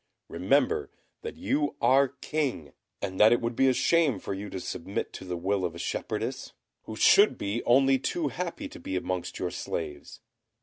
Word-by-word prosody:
Remember 440 Hz, -1 st, +1 dB, 0.3 s
that 460 Hz, -, -7 dB
you 150 Hz, -, 0 dB
are 135 Hz, +1 st, +4 dB
King, 135 Hz, -, -3 dB, 0.3 s
and 95 Hz, 0 st, -4 dB
that 110 Hz, +1 st, +7 dB
it 120 Hz, -, +4 dB
would 115 Hz, 0 st, -3 dB
be 135 Hz, -, +4 dB
a 130 Hz, -, +4 dB
shame 155 Hz, -3 st, +2 dB
for 95 Hz, -, -5 dB
you 100 Hz, +1 st, -6 dB
to 95 Hz, -, -5 dB
submit -, -, -4 dB
to -, -, -8 dB
the 90 Hz, -1 st, -4 dB
will 95 Hz, +2 st, -1 dB
of 85 Hz, -2 st, -2 dB
a -, -, -7 dB
shepherdess, -, -, -4 dB, 0.3 s
who 110 Hz, -, -7 dB
should 200 Hz, -, +5 dB
be 100 Hz, +4 st, -3 dB
only 135 Hz, +2 st, +4 dB
too 150 Hz, +3 st, -1 dB
happy 180 Hz, -, -5 dB
to 305 Hz, +2 st, -11 dB
be 285 Hz, +2 st, -5 dB
amongst -, -, -3 dB
your -, -, -2 dB
slaves. 395 Hz, -7 st, -5 dB
135 Hz, 185 wpm, -28 LUFS, -, 0.3 s, that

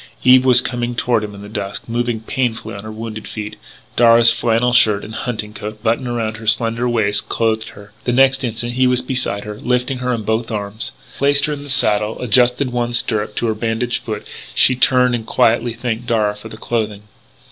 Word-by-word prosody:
Eve 130 Hz, 0 st, +6 dB
was 125 Hz, -1 st, +6 dB
coming 120 Hz, -1 st, -3 dB
toward 120 Hz, -2 st, +1 dB
him 105 Hz, -1 st, -7 dB
in 100 Hz, -, -10 dB
the -, -, -9 dB
dusk, 100 Hz, -1 st, -5 dB
moving 120 Hz, -1 st, -2 dB
painfully 120 Hz, 0 st, -3 dB
on 100 Hz, -, -7 dB
her 110 Hz, -, -7 dB
wounded 110 Hz, 0 st, -7 dB
feet. 105 Hz, -1 st, -6 dB, 0.4 s
Darragh's 115 Hz, 0 st, +6 dB
flannel 120 Hz, +1 st, +1 dB
shirt 105 Hz, -4 st, +5 dB
and 110 Hz, -, -9 dB
his 110 Hz, -, -5 dB
hunting 110 Hz, -3 st, -4 dB
coat 105 Hz, 0 st, -8 dB
buttoned 115 Hz, +2 st, 0 dB
around 115 Hz, -2 st, -2 dB
her 110 Hz, -1 st, -10 dB
slender 115 Hz, +2 st, +1 dB
waist 110 Hz, -4 st, 0 dB
clothed 110 Hz, -1 st, 0 dB
her. 105 Hz, 0 st, -14 dB
The 125 Hz, -, +1 dB
next 135 Hz, +2 st, +3 dB
instant 120 Hz, 0 st, -3 dB
he 130 Hz, +1 st, +2 dB
was 125 Hz, 0 st, +2 dB
beside 125 Hz, -6 st, -1 dB
her, 105 Hz, 0 st, -8 dB
lifting 125 Hz, +1 st, -1 dB
her 125 Hz, 0 st, -1 dB
in 115 Hz, -3 st, -2 dB
both 110 Hz, +2 st, -1 dB
arms. 105 Hz, 0 st, -4 dB
As -, -, -24 dB
he -, -, -17 dB
placed 140 Hz, 0 st, +4 dB
her 150 Hz, -, -1 dB
in 145 Hz, -, -6 dB
the 145 Hz, -, -9 dB
saddle 105 Hz, -4 st, +2 dB
and -, -, -7 dB
adjusted 125 Hz, +2 st, +2 dB
one 120 Hz, -1 st, -2 dB
stirrup 105 Hz, -3 st, 0 dB
to -, -, -1 dB
her 110 Hz, -, +1 dB
bandaged 115 Hz, +2 st, -2 dB
foot, 110 Hz, -2 st, -6 dB, 0.3 s
she 130 Hz, -, +5 dB
turned 125 Hz, 0 st, +3 dB
and 120 Hz, -2 st, -2 dB
quietly 115 Hz, +1 st, +2 dB
thanked 120 Hz, 0 st, -4 dB
Darragh 105 Hz, -3 st, 0 dB
for 110 Hz, -, -10 dB
the 110 Hz, -, -10 dB
clothing. 110 Hz, -3 st, -3 dB
115 Hz, 220 wpm, -18 LUFS, 110-125 Hz, 0.4 s, Eve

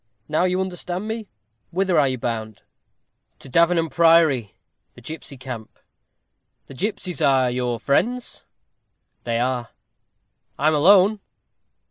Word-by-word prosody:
Now 155 Hz, +4 st, +1 dB
you 185 Hz, 0 st, 0 dB
understand 185 Hz, +1 st, -4 dB
me. 220 Hz, -1 st, -4 dB, 0.4 s
Whither 185 Hz, -2 st, +1 dB
are 140 Hz, -, +4 dB
you 130 Hz, -1 st, -1 dB
bound?" 110 Hz, -3 st, -5 dB, 0.7 s
"To -, -, -12 dB
Davenham 170 Hz, +4 st, +3 dB
Priory, 165 Hz, -, +3 dB, 0.4 s
the -, -, -14 dB
gipsy 155 Hz, -3 st, -8 dB
camp." 125 Hz, -4 st, -8 dB, 0.9 s
"The -, -, -12 dB
gipsies 185 Hz, -, -3 dB
are 130 Hz, -3 st, +3 dB
your 125 Hz, -1 st, -2 dB
friends?" 240 Hz, -, -1 dB, 0.8 s
"They 115 Hz, -1 st, -1 dB
are." 125 Hz, -1 st, -1 dB, 0.9 s
"I 150 Hz, +4 st, +3 dB
am -, -, +1 dB
alone." 195 Hz, +7 st, +5 dB
155 Hz, 120 wpm, -22 LUFS, 125-180 Hz, 0.9 s, alone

